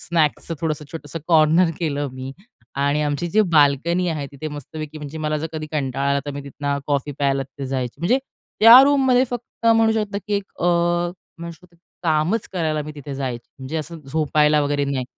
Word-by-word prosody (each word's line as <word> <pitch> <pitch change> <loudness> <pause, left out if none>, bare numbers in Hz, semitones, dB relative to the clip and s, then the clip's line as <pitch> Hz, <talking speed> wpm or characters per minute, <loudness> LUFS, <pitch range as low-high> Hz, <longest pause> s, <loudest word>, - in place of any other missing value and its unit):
स्नॅक्सचं 165 0 0
थोडंसं 155 -2 -2
छोटंसं 160 -1 -6
कॉर्नर 165 +2 +5
केलं 145 -3 -1
मी. 130 +1 -7 0.5
आणि 145 +1 +1
आमची 145 +3 -1
जी 215 - +4
बाल्कनी 155 +4 +3
आहे 155 -4 -3
तिथे 140 +3 -6
मस्तपैकी 155 +1 -7
म्हणजे 150 +1 -7
मला 155 0 -1
जर 160 - -3
कधी 155 -1 -5
कंटाळा 140 -2 -1
आला 140 0 +2
तर - - -2
मी 140 - -5
तिथनं 140 0 -3
कॉफी 145 0 -1
प्यायला 140 -1 +1
तिथे 135 +1 -8
जायची. 130 -2 -3
म्हणजे 210 +10 +2 0.4
त्या 230 +3 +11
रूममध्ये 265 -3 +4
फक्त 240 -1 -6
म्हणू 225 -1 +5
शकतो, 210 -2 -2
की 210 - -1
एक 200 - 0 0.2
अ, - - +2 0.7
म्हणू 170 0 -6
शकतो 170 +1 -20 0.3
कामच 165 +7 +1
करायला 155 -4 -1
मी 150 +1 -8
तिथे 145 -1 -7
जायची. 130 -3 -4
म्हणजे 135 +4 -5
असं 160 +1 -5
झोपायला 150 +1 +2
वगैरे 145 0 0
नाही. 135 -2 -2
155 Hz, 185 wpm, -21 LUFS, 140-170 Hz, 0.7 s, त्या